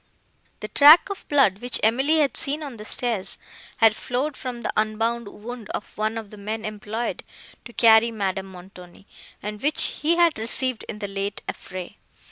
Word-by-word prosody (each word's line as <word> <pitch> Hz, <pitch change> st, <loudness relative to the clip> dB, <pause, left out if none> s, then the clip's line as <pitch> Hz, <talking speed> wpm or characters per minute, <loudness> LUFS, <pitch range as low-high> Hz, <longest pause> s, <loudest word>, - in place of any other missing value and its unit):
The 215 Hz, -, -4 dB
track 300 Hz, -, +7 dB
of 395 Hz, -, -8 dB
blood, 260 Hz, -10 st, +3 dB
which 245 Hz, +1 st, 0 dB
Emily 265 Hz, +8 st, +3 dB
had 280 Hz, -5 st, +1 dB
seen 295 Hz, +2 st, -1 dB
on 275 Hz, -5 st, -7 dB
the 210 Hz, -, -9 dB
stairs, 225 Hz, -5 st, -2 dB, 0.4 s
had 225 Hz, -3 st, +5 dB
flowed 260 Hz, +6 st, -2 dB
from 245 Hz, -2 st, -6 dB
the -, -, -2 dB
unbound 225 Hz, +2 st, 0 dB
wound 225 Hz, +2 st, -9 dB
of -, -, -8 dB
one 215 Hz, +1 st, -1 dB
of 220 Hz, -3 st, -7 dB
the 210 Hz, -, -11 dB
men 215 Hz, +2 st, -5 dB
employed 215 Hz, +2 st, -4 dB, 0.4 s
to 235 Hz, -, -10 dB
carry 225 Hz, 0 st, +6 dB
Madame 195 Hz, -3 st, -3 dB
Montoni, 180 Hz, 0 st, -14 dB, 0.4 s
and 210 Hz, +1 st, -6 dB
which 295 Hz, +2 st, 0 dB
he 320 Hz, +3 st, +3 dB
had 340 Hz, -6 st, +3 dB
received 240 Hz, +2 st, 0 dB
in 215 Hz, -, -5 dB
the 205 Hz, -1 st, -4 dB
late 195 Hz, 0 st, -4 dB
affray. 185 Hz, +2 st, -7 dB
225 Hz, 175 wpm, -24 LUFS, 205-255 Hz, 0.4 s, track